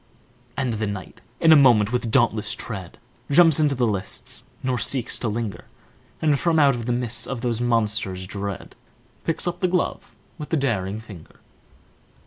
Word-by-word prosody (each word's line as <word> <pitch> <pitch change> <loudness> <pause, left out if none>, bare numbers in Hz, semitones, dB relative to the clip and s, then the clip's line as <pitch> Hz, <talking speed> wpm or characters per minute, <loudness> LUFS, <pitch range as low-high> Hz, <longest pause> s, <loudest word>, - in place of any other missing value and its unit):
And 130 -4 -1
the 110 0 -2
knight, 100 -2 -7 0.2
in 165 - +5
a - - +10
moment, 120 -7 +5
with 120 -2 -1
dauntless 110 -4 +2
tread, 95 -7 -7 0.3
Jumps 160 +1 +6
into 150 -2 +2
the 125 -1 +1
lists, 100 -3 -2 0.2
nor 130 -2 0
seeks 125 +2 -1
to 120 - -2
linger, 110 -2 -4 0.6
And, 150 -3 +3
from 165 +1 +1
out 135 -6 +3
the - - +1
midst 120 -2 -1
of 130 -3 -4
those 120 -2 -1
monsters 105 -6 0
dread, 100 0 -6 0.5
Picks 165 +2 -1
up 175 0 -2
the 185 - +2
glove 180 0 -2 0.2
with 150 - -7
a - - +1
daring 110 -6 -1
finger. 100 -8 -13
120 Hz, 165 wpm, -23 LUFS, 105-140 Hz, 0.6 s, a